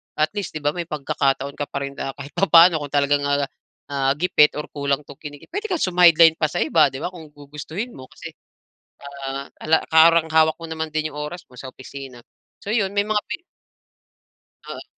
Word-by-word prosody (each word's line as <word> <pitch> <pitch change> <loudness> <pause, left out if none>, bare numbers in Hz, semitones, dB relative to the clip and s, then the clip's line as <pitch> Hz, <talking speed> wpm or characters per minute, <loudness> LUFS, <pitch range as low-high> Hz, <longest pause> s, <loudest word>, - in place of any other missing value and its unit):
at 155 0 +1
least 200 - -4
'di 155 - -4
ba 145 - +2
may 175 +1 -5
pagkakataon 140 -2 -1
ka 145 - -1
pa 140 - -4
rin 140 - -5
na 135 - -5
kahit 140 +1 -10
papano 170 -3 +5
kung 145 -1 -8
talagang, 145 0 +2
ah, 140 -1 -2
gipit 150 -2 +3
or 150 - -6
kulang 140 0 -2
'tong 140 -1 -14
kinikita 145 -2 -11
puwede 415 +5 -3
kang 360 -5 -2
sumadline 170 -3 +5
pa 155 - +2
sa 150 - -1
iba 160 -1 +4
'di 135 +1 -7
ba, 180 - -3
kung 165 -4 -12
gugustuhin 150 - -7
mo 130 - -12
kasi, - - -11 0.7
ah, 140 -1 -7 0.2
ala 160 +1 +3
parang 160 0 +5
hawak 160 0 +2
mo 165 - -8
naman 160 -1 -5
din 155 0 -1
yung 150 - -7
oras 175 +4 -8
mo 125 - -19
sa 130 +1 -9
opisina. 130 -1 -10 0.4
So 205 - -8
yun, 205 -3 0
may 205 +1 0
mga 215 -1 +1
pi - - 0 1.3
Oo. - - -7
150 Hz, 200 wpm, -22 LUFS, 140-165 Hz, 1.3 s, papano